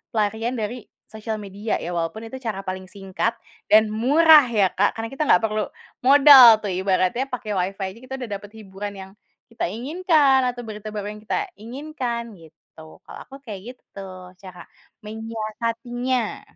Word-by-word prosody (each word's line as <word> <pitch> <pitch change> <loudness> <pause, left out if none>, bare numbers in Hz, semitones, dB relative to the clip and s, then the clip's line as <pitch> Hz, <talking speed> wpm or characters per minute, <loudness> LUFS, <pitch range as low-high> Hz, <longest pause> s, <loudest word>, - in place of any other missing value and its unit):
pelarian 220 +3 -1
dari 235 +1 -5 0.2
sosial 220 0 -5
media 205 +1 -4
ya 175 - -6
walaupun 170 +6 -3
itu 260 +4 -8
cara 215 -5 -4
paling 185 0 -5
singkat 195 +3 -3 0.3
dan 215 0 +5
murah 290 +6 +6
ya 205 -5 +2
Kak 205 +3 +1
karena 225 0 -4
kita 270 - -1
enggak 180 - +5
perlu 215 -1 -2 0.3
modal 265 -3 +9
tuh 205 - -2
ibaratnya 190 +6 0
pakai 235 -4 -5
Wi-Fi 195 +1 -2
aja 225 - -16
kita 255 +1 -7
udah 250 -3 -7
dapat 205 - -13
hiburan 205 -1 -7
yang, 190 -1 -10 0.4
kita - - -2
inginkan 285 - +2
atau 245 0 -7
berita 215 -1 -7
baru 210 -1 -5
yang 210 - -12
kita 315 - -2
inginkan 240 -1 -5
gitu 160 0 -17
kalau - - -11
aku 270 - -12
kayak 215 +3 -8
gitu - - -43
tuh 185 -2 -10
cara 185 -2 -11 0.4
menyiasatinya. 230 +2 -3
220 Hz, 165 wpm, -22 LUFS, 195-245 Hz, 0.4 s, modal